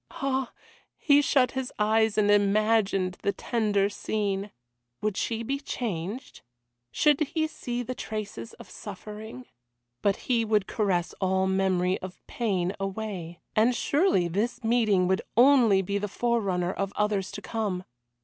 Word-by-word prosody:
Ah! 265 -2 -2 0.5
he 290 -1 +5
shut 260 -3 +3
his 265 -1 -3
eyes 220 0 +2
and 205 -1 +4
imagined 205 -2 +2
the 200 - +1
tender 205 -3 0
scene. 200 -1 -2 0.5
Would 210 -2 0
she 230 +2 -2
be 275 +4 -2
changed? 225 - -5 0.5
Should 295 - +3
he 315 +1 0
see 245 -6 -4
the 255 - -4
traces 210 - -6
of - - -13
suffering? 210 - -9 0.6
But 200 -1 +2
he 235 -3 +2
would 210 -2 +2
caress 190 -5 0
all 190 0 +2
memory 190 -1 +1
of 185 0 -10
pain 190 -6 -1
away, 195 -4 -5
and 230 +3 +4
surely 280 - +2
this 220 +8 -2
meeting 220 -5 +3
would 190 +1 +1 0.2
only 240 -7 +6
be 200 +2 -1
the 205 - -2
forerunner 195 -5 0
of 195 0 -2
others 205 -2 0
to 205 - -6
come. 205 -5 -2
210 Hz, 140 wpm, -27 LUFS, 190-235 Hz, 0.6 s, only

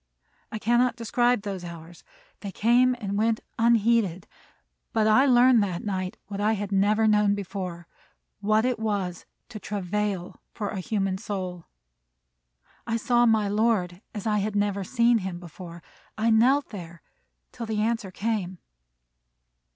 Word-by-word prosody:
I - - -4
cannot 240 +2 +2
describe 240 -1 +1
those 195 -3 -5
hours. 170 0 -10 0.4
They 200 - -6
came 245 +5 +3
and 200 -2 -3
went 225 0 +1 0.2
unheeded; 225 -5 +2 0.7
but 220 -2 +2
I 220 +6 +5
learned 250 -2 +6
that 185 -4 -2
night 185 -2 -3
what 200 0 -5
I 215 +2 +2
had 205 -1 -4
never 205 +3 +3
known 210 -1 +3
before, 185 -3 -6 0.5
what 215 +2 +2
it 250 -3 0
was 200 -5 -3 0.2
to 215 - -8
travail 200 -2 -3
for 205 -3 -5
a 195 - -4
human 195 -1 -1
soul. 185 -5 -5 1.2
I 230 0 0
saw 240 +1 +3
my 220 -2 +3
Lord 205 -4 0
as 205 - -5
I 210 -1 +1
had 205 +1 -2
never 205 -1 0
seen 235 +3 +3
him 185 -3 -5
before. 170 0 -11 0.3
I 225 +1 +2
knelt 260 +6 +3
there 170 -5 -10 0.5
till 230 - -7
the 215 -1 -1
answer 225 -3 -1
came. 195 -2 -3
210 Hz, 145 wpm, -26 LUFS, 190-225 Hz, 1.2 s, learned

